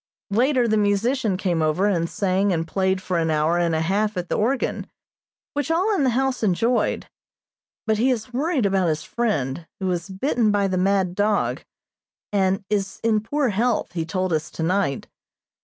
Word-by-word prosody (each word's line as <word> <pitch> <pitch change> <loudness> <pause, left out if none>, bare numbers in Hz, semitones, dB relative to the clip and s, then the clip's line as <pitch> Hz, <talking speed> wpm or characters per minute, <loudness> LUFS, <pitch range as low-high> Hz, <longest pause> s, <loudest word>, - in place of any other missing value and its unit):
Later 250 +3 +2
the 220 -1 +2
musician 210 +1 +1
came 175 -4 0
over 155 +5 +1
and 170 -5 +1
sang 195 0 +1
and 165 -2 -1
played 190 +1 0
for 180 -2 -1
an 165 -1 0
hour 155 +2 +2
and 170 -2 +1
a 160 - 0
half 205 +4 0
at 180 -1 -3
the - - 0
organ, 250 +5 -1 0.7
which 290 +2 -2
all 365 +7 +2
in 370 - +1
the 260 - +3
house 265 +1 0
enjoyed; 225 +4 +1 0.8
but 220 -1 +1
he 250 +4 +3
is 245 -1 -2
worried 280 -1 0
about 195 -2 +2
his 155 -1 -1
friend, 165 - -2
who 190 - -3
was 180 0 -2
bitten 225 +3 0
by 205 -1 +2
the 185 - -1
mad 190 -1 +1
dog, 205 +2 0 0.7
and 195 -1 +1
is 195 -2 -2
in 225 -1 +3
poor 275 +4 0
health, 225 +3 0
he 165 -2 -1
told 185 +2 -2
us 155 -1 -1
tonight. 165 -4 -1
200 Hz, 180 wpm, -23 LUFS, 180-230 Hz, 0.8 s, the